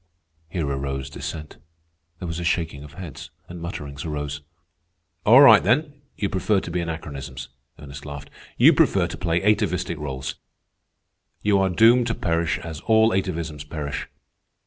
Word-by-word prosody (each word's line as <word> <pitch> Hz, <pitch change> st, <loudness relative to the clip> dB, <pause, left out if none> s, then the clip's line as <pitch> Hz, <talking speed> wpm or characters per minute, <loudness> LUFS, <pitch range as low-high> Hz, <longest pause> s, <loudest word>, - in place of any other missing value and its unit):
Here 85 Hz, -3 st, -2 dB
arose 70 Hz, 0 st, -3 dB
dissent. 75 Hz, +2 st, -7 dB, 0.6 s
There 90 Hz, -, -6 dB
was 85 Hz, +1 st, -4 dB
a -, -, -4 dB
shaking 80 Hz, -4 st, -1 dB
of 75 Hz, -1 st, -12 dB
heads, 85 Hz, -4 st, -9 dB, 0.2 s
and 85 Hz, -1 st, -9 dB
mutterings 75 Hz, -5 st, -6 dB
arose. 75 Hz, -2 st, -4 dB, 0.9 s
"All 125 Hz, +6 st, +9 dB
right, 115 Hz, -7 st, +9 dB
then, 145 Hz, -, +1 dB, 0.2 s
you 100 Hz, -, 0 dB
prefer 100 Hz, +2 st, +1 dB
to -, -, -7 dB
be 90 Hz, -, -1 dB
anachronisms," 70 Hz, -7 st, -6 dB, 0.3 s
Ernest 70 Hz, -1 st, -10 dB
laughed. 70 Hz, -1 st, -8 dB, 0.3 s
"You -, -, +7 dB
prefer -, -, +3 dB
to -, -, -5 dB
play 85 Hz, 0 st, -1 dB
atavistic 90 Hz, -5 st, +1 dB
rôles. 65 Hz, -2 st, -5 dB, 1.1 s
You 105 Hz, -1 st, +3 dB
are 95 Hz, 0 st, +2 dB
doomed 115 Hz, +6 st, +5 dB
to 115 Hz, -, -1 dB
perish 85 Hz, 0 st, 0 dB
as 80 Hz, -4 st, -7 dB
all 110 Hz, 0 st, +5 dB
atavisms 85 Hz, -6 st, -2 dB
perish. 75 Hz, -3 st, -4 dB
85 Hz, 150 wpm, -23 LUFS, 75-95 Hz, 1.1 s, All